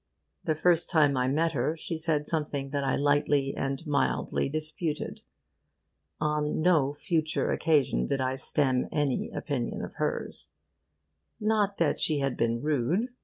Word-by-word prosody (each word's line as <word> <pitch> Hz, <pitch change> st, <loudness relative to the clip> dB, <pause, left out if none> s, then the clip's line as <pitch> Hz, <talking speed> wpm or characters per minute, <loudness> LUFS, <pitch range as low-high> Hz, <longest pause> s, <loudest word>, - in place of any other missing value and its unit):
The 155 Hz, -, +1 dB
first 170 Hz, +1 st, +2 dB
time 150 Hz, -5 st, +4 dB
I 125 Hz, 0 st, +1 dB
met 160 Hz, +5 st, +1 dB
her, 150 Hz, +3 st, -1 dB
she 165 Hz, -, -4 dB
said 160 Hz, -2 st, 0 dB
something 145 Hz, -4 st, -2 dB
that 140 Hz, -1 st, -1 dB
I 135 Hz, -, +1 dB
lightly 145 Hz, -1 st, +2 dB
and 135 Hz, +4 st, -3 dB
mildly 145 Hz, -2 st, 0 dB
disputed. 155 Hz, +1 st, -3 dB, 1.0 s
On 150 Hz, 0 st, 0 dB
no 155 Hz, -4 st, +3 dB
future 155 Hz, 0 st, 0 dB
occasion 140 Hz, -, +2 dB
did 140 Hz, -, 0 dB
I 130 Hz, 0 st, 0 dB
stem 130 Hz, -3 st, +1 dB
any 145 Hz, -4 st, 0 dB
opinion 130 Hz, -6 st, -3 dB
of -, -, -7 dB
hers. -, -, -3 dB, 0.9 s
Not 210 Hz, -2 st, +1 dB
that 165 Hz, -3 st, +1 dB
she 155 Hz, -, +1 dB
had 135 Hz, -2 st, 0 dB
been 115 Hz, +1 st, 0 dB
rude. 155 Hz, -, +1 dB
150 Hz, 145 wpm, -28 LUFS, 135-160 Hz, 1.0 s, time